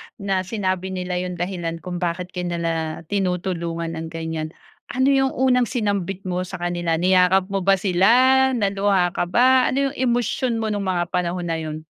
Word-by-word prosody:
na 195 -3 -1
sinabi 185 -1 -2
nila 180 -1 -3
'yong 180 0 -4
dahilan 175 -2 -4
kung 180 -1 -4
bakit 180 +1 -3
ka 180 - -6
nila 165 -2 -2
tinutulungan 175 -3 -2
ng 165 0 -5
ganiyan. 160 -1 -5 0.3
Ano 260 +2 +2
'yong 270 -1 +2
unang 250 -2 +3
sinambit 200 -5 -2
mo 180 0 -3
sa - - -7
kanila? 175 -2 0
Niyakap 185 +2 +3
mo 195 - 0
ba 195 +1 +3
sila, 240 +9 +4
naluha 195 -4 +1
ka 175 - -2
ba, 255 +5 +4
ano 275 +1 0
'yong - - -11
emosyon 240 -1 0
mo 220 - -1
no'ng 205 -1 -2
mga 175 -2 -1
panahon 175 0 -1
na 165 - -1
'yon? 155 0 -6
185 Hz, 175 wpm, -22 LUFS, 175-205 Hz, 0.3 s, sila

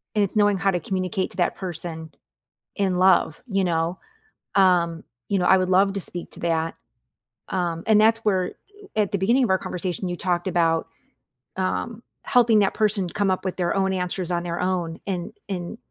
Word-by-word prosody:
and 210 - +3
it's 200 - -3
knowing 205 -2 +4
how 195 +1 +2
to 180 - -1
communicate 185 +2 -2
to 190 - -11
that 175 - +1
person 165 -3 -6 0.7
in 190 -3 +1
love, 185 -2 +3
you 195 -4 +1
know? 170 +1 -1 0.5
Um, 175 -4 +3 0.2
you 200 -2 +1
know, - - +1
I 190 - +6
would 185 0 0
love 195 +1 +4
to 200 - -2
speak 175 0 -6
to - - -12
that. 165 -1 -1 0.7
Um, 170 -3 -2
and 220 -1 +5
that's 225 +1 +4
where 185 -3 +1 0.4
at 210 -2 +1
the 200 - 0
beginning 235 +8 +2
of - - 0
our 190 - +4
conversation, 180 0 -4
you 175 -1 -3
talked 175 -2 -1
about, 165 -3 +1 0.7
um, 215 +5 -2 0.2
helping 240 -4 +4
that 195 -2 +2
person 205 -4 +1
come 200 +2 0
up 185 - 0
with 185 -1 -3
their 175 -2 0
own 190 -1 +1
answers 180 -1 -2
on 175 -1 0
their 170 -1 -3
own, 175 -3 -1
and 185 +1 -3 0.2
and 180 +3 -4
185 Hz, 190 wpm, -24 LUFS, 175-195 Hz, 0.7 s, I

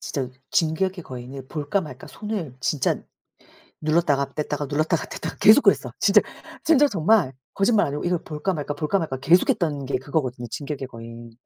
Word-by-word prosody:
진짜 135 -3 -3 0.2
진격의 175 +2 0
거인을 130 +1 -8
볼까 150 +6 -1
말까 135 -7 -9
손을 200 - -5
진짜 130 +1 +1 0.9
눌렀다가 155 -3 +1
뗐다가 150 -1 -3
눌렀다가 155 +3 0
뗐다가 - - -6
계속 220 +7 +8
그랬어 - - +3
진짜. - - +5 0.4
진짜로 295 -3 +5
정말 185 - +3 0.2
거짓말 210 +2 +3
아니고 145 +1 -4
이걸 175 -1 +1
볼까 155 +5 -2
말까 150 -3 -3
볼까 150 +7 0
말까 155 -6 -3
계속했던 150 -1 +2
게 140 - 0
그거거든요 130 -5 -3
진격의 140 +1 -5
거인. 115 -1 -10
150 Hz, 380 characters per minute, -24 LUFS, 135-180 Hz, 0.9 s, 계속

